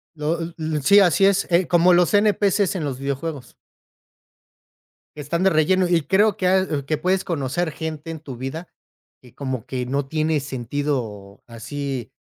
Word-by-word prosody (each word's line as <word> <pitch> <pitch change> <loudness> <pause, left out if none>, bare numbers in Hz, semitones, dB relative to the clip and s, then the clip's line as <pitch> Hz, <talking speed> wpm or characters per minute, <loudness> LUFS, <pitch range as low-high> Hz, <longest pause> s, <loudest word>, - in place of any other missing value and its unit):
Lo 155 +2 -2 0.2
l 155 -2 -2
sí, 200 +9 +7
así 195 0 +4
es, 200 0 +2
eh, 175 0 +3
como 175 +1 +4
los 175 +3 +3
NPC's 205 -2 +2
en 175 - -2
los 135 -3 -3
videojuegos 140 0 -5 1.6
que 150 - -7
están 170 +5 -2
de 190 - +5
relleno 180 +3 +2
y 175 -1 +2
creo 200 +6 +2
que 185 - 0
a 190 +1 +3
oh, 140 - -10
que 155 +2 -1
puedes 185 +4 0
conocer 160 +1 -2
gente 160 0 -6
en 160 - -7
tu 140 -5 -9
vida 135 +7 -6 0.5
y 125 - -17
como 130 -5 -5
que 125 -1 -4
no 135 +2 -2
tiene 155 +1 0
sentido 125 -6 -4
así, 125 +1 -6
155 Hz, 170 wpm, -22 LUFS, 135-180 Hz, 1.6 s, sí